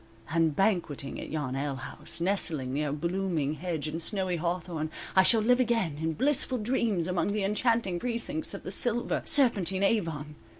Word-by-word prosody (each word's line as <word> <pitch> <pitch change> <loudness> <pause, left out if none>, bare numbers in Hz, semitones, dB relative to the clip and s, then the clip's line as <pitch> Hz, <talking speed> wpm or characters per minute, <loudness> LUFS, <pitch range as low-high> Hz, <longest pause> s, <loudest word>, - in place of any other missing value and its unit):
And 165 -2 +2
banqueting 175 -9 0
at - - -7
yon 145 -4 -2
alehouse, 140 +3 -5
Nestling 165 -8 0
near 145 0 0
blooming 170 -1 -1
hedge 160 -2 -3
and 160 +2 -3
snowy 185 -1 -1
Hawthorn, 170 -2 -2 0.3
I 190 - +8
shall 220 +4 +6
live 245 +3 +4
again 225 - +1
In 160 0 0
blissful 260 - 0
dreams 215 -6 0
among 185 +2 0
the 210 -1 0
enchanting 210 -2 +1
Precincts 250 - -2
of - - -8
the - - -5
silver, 240 0 0
serpentine 195 - +3
Avon. 165 -8 0
180 Hz, 160 wpm, -29 LUFS, 155-220 Hz, 0.3 s, I